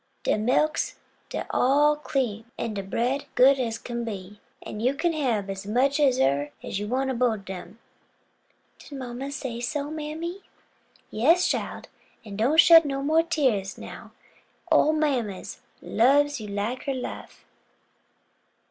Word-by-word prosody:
"De - - +2
milk's 250 +8 +1 0.4
mos' - - -3
all 290 +3 +4
cream, 240 -7 -3
an' 230 - -3
de 200 - -3
bread 240 +8 -1
good 270 +2 +6
as 230 -3 -1
kin 235 0 -5
be: 205 -2 -7 0.2
an' 210 - -7
you 255 +5 +1
kin 340 +3 0
hab 240 -10 0 0.2
much 265 +7 +2
as 275 -4 +4
eber 140 +2 +2
you 205 +1 -4
want 265 +3 0
ob 240 - -4
both 245 -2 +3
ob 195 -2 -12
dem." 190 +3 -8 1.0
"Did 285 - -10
mamma 260 +2 -6
say 260 -4 -5
so, 285 +4 -3
mammy?" 315 +4 -5 0.7
"Yes, 330 +11 +3
chile; - - -2 0.4
an' 205 -2 -8
don't 255 +10 +2
shed 330 -1 +9
no 275 -2 -3
mo' 315 +3 +4
dose 335 - -12
tears 240 - 0
now; - - -10 0.6
ole 310 - +5
mammy 255 -11 -1 0.4
lubs 285 +2 +3
you 210 - -6
like 205 +5 -3
her 275 -2 -1
life." 255 - -7
255 Hz, 150 wpm, -26 LUFS, 215-290 Hz, 1.0 s, shed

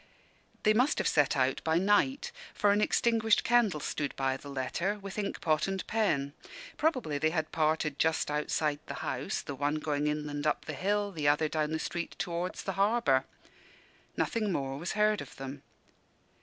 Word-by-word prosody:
They 215 - +5
must 250 +7 +3
have - - +1
set 145 -2 +3
out 130 0 +1
by 160 0 +2
night; 205 +9 +2 0.2
for 205 - +3
an 205 +1 +3
extinguished 225 0 +3
candle 235 -9 +3
stood 145 0 -3
by 135 -1 0
the 140 +1 -9
letter, 155 +9 -2
with 200 0 -6
ink 200 - -3
pot 155 +1 +2
and 195 -1 -3
pen. 155 -11 0 0.4
Probably 255 - 0
they 155 - +3
had 160 -1 -2
parted 155 -2 0
just 160 -2 +1
outside 150 0 0
the - - -5
house, - - -2
the 145 - -5
one 145 +2 0
going 150 -1 -1
inland 150 0 -2
up 150 - 0
the - - -4
hill, 205 +1 0
the 155 -5 -2
other 150 +2 +3
down 155 0 -1
the 160 - 0
street 170 +1 -4
towards 175 +1 -3
the 195 - -2
harbour. 200 - +3 0.9
Nothing 215 -3 0
more 135 -4 -2
was 170 - -3
heard 210 0 +2
of - - -10
them. 135 +1 -7
160 Hz, 180 wpm, -30 LUFS, 145-205 Hz, 0.9 s, They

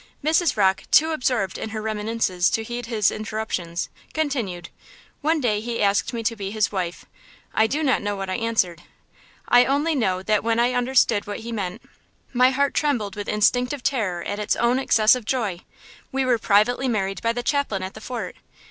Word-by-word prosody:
Mrs. 315 -1 +2
Rocke, 190 -2 +2
too 320 +1 +5
absorbed 250 -9 -1
in 220 - -4
her 220 0 -4
reminiscences 215 -4 0
to 225 - -1
heed 240 +1 -5
his 215 -4 +2
interruptions, 215 -6 -3 0.3
continued: 235 - -2 0.5
"One 315 +2 +2
day 215 -6 0
he 235 +1 -4
asked 205 +2 +2
me 235 -2 -4
to 230 +1 0
be 200 -2 -5
his 215 0 0
wife. 180 -3 -4 0.5
I 220 - +3
do 295 +7 -1
not 265 -3 +2
know 205 0 -2
what 195 -1 -4
I 185 - -2
answered. 200 -7 0 0.7
I 245 0 +6
only 290 +4 +1
know 190 -9 0
that 210 +1 +1
when 230 0 +1
I 245 +1 +2
understood 245 -4 +2
what 205 +2 -5
he 235 +1 -6
meant, 195 -5 -4 0.5
my 250 +1 +5
heart 280 +1 +1
trembled 240 -10 0
with 205 -1 -5
instinctive 245 +5 +1
terror 205 -10 -1
at 205 - -4
its 210 - 0
own 240 +2 +2
excessive 230 -1 +4
joy! 210 -7 -1 0.5
We 270 0 0
were 245 -2 +2
privately 225 +6 +2
married 195 -5 -1
by 230 - +1
the 245 0 -3
chaplain 260 -9 0
at 190 - -5
the 215 - -11
fort. 245 +2 -5
225 Hz, 190 wpm, -23 LUFS, 205-250 Hz, 0.7 s, I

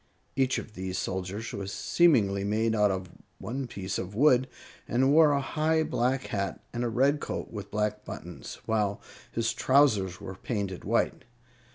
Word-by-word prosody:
Each 135 -1 +2
of 110 - -6
these 95 -1 -4
soldiers 95 +4 -3
was 100 -1 -4
seemingly 105 - +3
made 110 +2 +1
out 105 -2 +4
of 95 -2 -3 0.3
one 130 +3 -4
piece 95 -4 -4
of 95 +2 -6
wood, 130 0 +5 0.4
and 130 +3 +3
wore 155 -1 +7
a 140 - +2
high 160 +3 +1
black 130 -1 0
hat 100 -1 -2
and 120 0 -2
a 120 - 0
red 135 +5 +2
coat - - -5
with 100 -3 -7
black 105 0 -1
buttons, - - -8
while 105 -2 0 0.3
his 115 +1 0
trousers 115 -9 +3
were 95 - -7
painted 100 -2 -4
white. - - +1
110 Hz, 165 wpm, -28 LUFS, 100-130 Hz, 0.4 s, wore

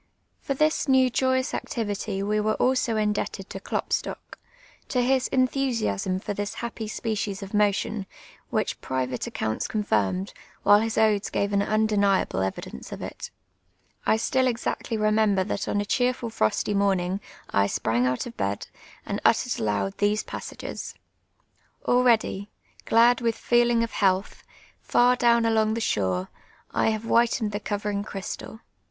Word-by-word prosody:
For 275 - -3
this 305 +2 +1
new 260 -1 +4
joyous 260 +1 +1
acti\'ity 205 -3 -3
wo 210 +1 +1
wore 215 +1 +1
also 255 -3 +1
indeljted 210 -2 -1
to 195 - -6
Klopstock, - - -3 0.2
— - - -28
to 250 -2 +1
his 260 0 +2
entliusiaam 245 - 0
for - - -2
tliis 205 +1 -4
ha|)})y 235 -2 -5
s])ecies 210 -2 -3
of 195 - -9
mo 210 -1 +4
tion, 210 -1 -4 0.4
wliich - - -1
private 130 -1 -2
accounts 110 0 -2
confirmed, 185 - 0 0.3
while 205 0 +7
his 225 0 -2
odes 215 -2 +3
«:ave 200 0 0
an 200 - +3
inideniable 200 - +2
evidence 95 -8 -5
of - - -6
it. - - -7 0.7
I 220 - +3
still 260 +3 +1
exactly 230 -1 -2
remend>er 215 -2 +2
that 200 - -2
on 205 - 0
a 205 - -1
cheerful 245 +1 0
frosty 110 - 0
moniint^ 195 -2 +1 0.3
I 100 0 +3
sprang 115 +4 +1
out 125 0 -1
of 240 - -8
bed, 100 +1 -3 0.4
and - - -3
uttered - - +2
aloud 100 -2 -1
these 205 +1 +2
passages: - - -7 0.4
— - - -39
"Already, 230 -5 +2 0.4
gl:ul 235 +1 +5
with 230 -1 +1
fcolinc; 240 -1 +3
of 230 - -3
health, 190 -1 0 0.4
Far 245 +1 +4
down 235 -1 +4
aloniif 220 -1 +2
the 230 - -2
shore, 95 - 0 0.4
I - - +2
have 220 0 -2
whitcn'd 230 -2 +2
The 205 - -3
coveriug 205 -1 -2
crj 195 -3 -6
stal. 220 - -7
210 Hz, 155 wpm, -26 LUFS, 195-235 Hz, 0.7 s, while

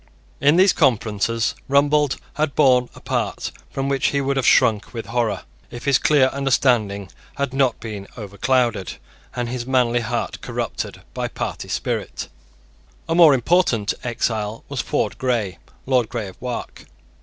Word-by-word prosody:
In 145 +3 +4
these 185 +1 +5
conferences 115 -1 +1 0.2
Rumbold 145 0 +3 0.2
had 150 -2 -1
borne 125 -4 +4
a - - -11
part - - -2 0.2
from 135 0 -3
which 135 -1 +1
he 140 - +1
would 140 0 0
have 135 - +1
shrunk 110 +2 +3
with 115 - -4
horror, 115 -5 -1 0.3
if 120 - -9
his 140 -2 +4
clear 140 -4 +4
understanding 120 -8 +1 0.2
had 140 -2 -2
not 135 -3 +2
been 105 -3 -7
overclouded, 110 0 0 0.4
and 120 -1 -2
his 120 0 -4
manly 125 -2 +2
heart 115 - -3
corrupted, - - -4
by - - -2
party - - -5
spirit. - - -3 0.8
A 165 - 0
more 165 -4 +7
important 125 - +2
exile 115 -3 -2
was - - -2
Ford - - -2
Grey, 115 -7 -1 0.3
Lord 125 -4 +2
Grey 110 -5 -4
of 95 - -16
Wark. 125 -1 -6
125 Hz, 150 wpm, -21 LUFS, 110-140 Hz, 0.8 s, more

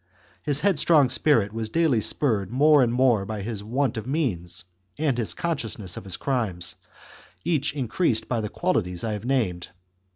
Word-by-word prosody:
His 145 0 0
headstrong 160 -7 +4
spirit 120 -6 +2
was 110 -1 -3
daily 155 -6 +2
spurred 105 -7 +1
more 145 +4 +5
and 120 -2 +2
more 120 -4 +3
by 105 0 -5
his 105 -2 -4
want 125 +2 -1
of 110 +1 -5
means 95 - -2 0.3
and 150 -4 +1
his 105 -8 -2
consciousness 115 - -3
of - - -8
his 95 - -4
crimes, 110 -11 -2 0.7
each 150 -3 0
increased 130 -1 0
by 120 -3 -1
the 105 - -4
qualities 100 - -1
I 110 -2 -1
have 105 +2 -6
named. 110 -10 0
120 Hz, 165 wpm, -25 LUFS, 105-145 Hz, 0.7 s, more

